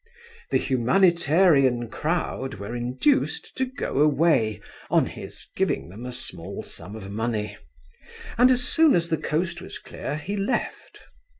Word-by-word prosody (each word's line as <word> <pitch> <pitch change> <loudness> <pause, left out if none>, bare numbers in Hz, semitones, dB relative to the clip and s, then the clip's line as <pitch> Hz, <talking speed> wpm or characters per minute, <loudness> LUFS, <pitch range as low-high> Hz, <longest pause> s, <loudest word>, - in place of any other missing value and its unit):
The - - +3
humanitarian 145 -2 +3
crowd 150 -1 -2
were 100 +4 -6
induced 125 - 0
to 260 - 0
go 250 - -3
away 145 -7 +3 0.3
on - - +4
his - - -9
giving - - 0
them 110 +7 -8
a - - -5
small 125 - -8
sum 90 +6 -9
of 100 -3 -8
money, 110 0 -2 0.8
and 245 +3 +6
as 250 -1 +3
soon 320 +3 +4
as 170 -1 +1
the 160 - +1
coast 170 +3 -2
was - - -8
clear 145 - -6
he 175 +7 -4
left. 210 +5 -3
150 Hz, 140 wpm, -25 LUFS, 120-185 Hz, 0.8 s, and